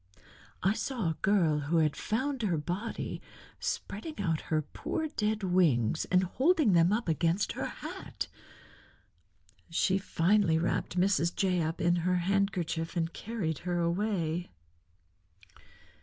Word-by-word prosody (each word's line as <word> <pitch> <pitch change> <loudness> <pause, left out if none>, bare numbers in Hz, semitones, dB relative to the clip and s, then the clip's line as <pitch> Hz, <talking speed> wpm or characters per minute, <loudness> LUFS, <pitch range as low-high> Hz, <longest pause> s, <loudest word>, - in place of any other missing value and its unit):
I 195 - +4
saw 225 -7 -1
a 160 - -6
girl, 175 -7 +3
who 150 +4 0
had 155 -2 +2
found 260 +4 -1
her 185 -7 +1
body, 180 +9 -4 0.4
spreading 260 +9 -4
out 165 -6 0
her 155 -1 +1
poor 315 - -3
dead 215 -6 -1
wings 160 - +2
and 180 0 +3
holding 270 - +3
them 170 +1 +5
up 220 0 0
against 170 +4 +1
her - - -3
hat. - - -6 1.4
She 190 +3 +2
finally 190 -2 +2
wrapped 175 +2 -1
Mrs. 180 -2 +2
Jay 185 -3 +1
up 160 +1 -2
in 175 +1 +3
her 180 +2 +1
handkerchief 180 -3 0
and 165 0 -1
carried 195 -10 -3
her 175 -1 -2
away." 175 -1 -1
180 Hz, 130 wpm, -30 LUFS, 165-205 Hz, 1.4 s, them